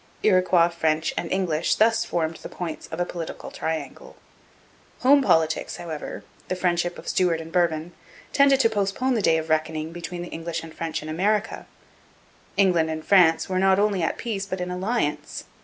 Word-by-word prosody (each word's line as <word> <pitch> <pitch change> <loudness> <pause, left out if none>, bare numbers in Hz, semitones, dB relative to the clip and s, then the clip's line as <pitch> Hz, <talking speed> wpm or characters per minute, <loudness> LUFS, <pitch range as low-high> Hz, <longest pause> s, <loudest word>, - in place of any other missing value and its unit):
Iroquois, 185 -4 +4
French, 160 -2 0
and 170 - -3
English 175 -4 +1
thus 225 +1 +3
formed 165 -1 -2
the - - -9
points 170 -3 -6
of 160 - -7
a 175 - +1
political 170 -2 -7
triangle. 160 0 -5 0.9
Home 280 +2 +6
politics, 160 - +1
however 165 -4 -6 0.2
the 185 - -2
friendship 175 -1 0
of - - -11
Stuart 175 -3 +1
and 165 0 -9
Bourbon 170 -2 0 0.4
tended 275 -1 +5
to 230 - +5
postpone 210 +5 0
the 225 - +1
day 165 -4 +3
of 160 0 -3
reckoning 155 0 -1
between 175 0 -6
the 175 - -8
English 165 0 -5
and 165 -1 -10
French 160 -2 -4
in - - -8
America. 205 +7 -1 0.9
England 175 -5 +3
and 155 0 -5
France 175 -5 +5
were 185 -1 -1
not 190 0 +4
only 200 -2 +1
at 165 - -1
peace 205 -4 -3
but 185 -1 -4
in 180 0 -3
alliance. 180 -6 -2
175 Hz, 175 wpm, -24 LUFS, 160-195 Hz, 0.9 s, Home